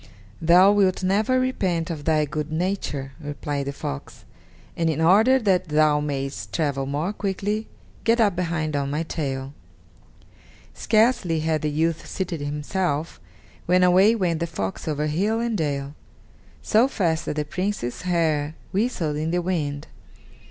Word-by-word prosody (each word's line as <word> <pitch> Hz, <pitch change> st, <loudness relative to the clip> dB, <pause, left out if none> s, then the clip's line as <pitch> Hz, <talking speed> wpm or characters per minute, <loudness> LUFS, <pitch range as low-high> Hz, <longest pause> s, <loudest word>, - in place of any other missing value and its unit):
"Thou 180 Hz, +4 st, +6 dB
wilt 195 Hz, -2 st, +2 dB
never 210 Hz, +7 st, +2 dB
repent 185 Hz, -10 st, -1 dB
of 150 Hz, -3 st, -6 dB
thy 155 Hz, -2 st, +3 dB
good 150 Hz, +1 st, -4 dB
nature," 155 Hz, -6 st, -2 dB
replied 145 Hz, -1 st, -4 dB
the -, -, -1 dB
fox, 70 Hz, -, -7 dB, 0.5 s
"and 165 Hz, -1 st, +1 dB
in 160 Hz, -, -1 dB
order 210 Hz, +11 st, +5 dB
that 190 Hz, -7 st, +1 dB
thou 150 Hz, -1 st, +3 dB
mayest 140 Hz, -2 st, -4 dB
travel 140 Hz, -4 st, -1 dB
more 150 Hz, +8 st, -2 dB
quickly, 205 Hz, +2 st, -2 dB, 0.4 s
get 230 Hz, +1 st, +3 dB
up 205 Hz, -5 st, +3 dB
behind 165 Hz, -4 st, -1 dB
on 140 Hz, -1 st, -1 dB
my 150 Hz, +3 st, -1 dB
tail." 135 Hz, -4 st, -4 dB, 1.2 s
Scarcely 215 Hz, -8 st, +2 dB
had 155 Hz, -1 st, 0 dB
the 150 Hz, -, 0 dB
youth 160 Hz, +2 st, -1 dB
seated 175 Hz, -5 st, -4 dB
himself, 150 Hz, +2 st, -2 dB, 0.5 s
when 180 Hz, +1 st, +4 dB
away 190 Hz, +5 st, +5 dB
went 175 Hz, -6 st, 0 dB
the 170 Hz, -, -1 dB
fox 100 Hz, -, -4 dB
over 150 Hz, -1 st, -1 dB
hill 195 Hz, +9 st, 0 dB
and 235 Hz, -1 st, -1 dB
dale, 140 Hz, -5 st, -2 dB, 0.7 s
so 225 Hz, +4 st, +4 dB
fast 170 Hz, -11 st, -1 dB
that -, -, -2 dB
the 150 Hz, 0 st, -1 dB
Prince's 180 Hz, -7 st, -3 dB
hair 160 Hz, -4 st, 0 dB, 0.2 s
whistled 185 Hz, -8 st, -1 dB
in 155 Hz, +1 st, -1 dB
the 175 Hz, +1 st, +1 dB
wind. 155 Hz, -6 st, -2 dB
165 Hz, 150 wpm, -24 LUFS, 150-190 Hz, 1.2 s, Thou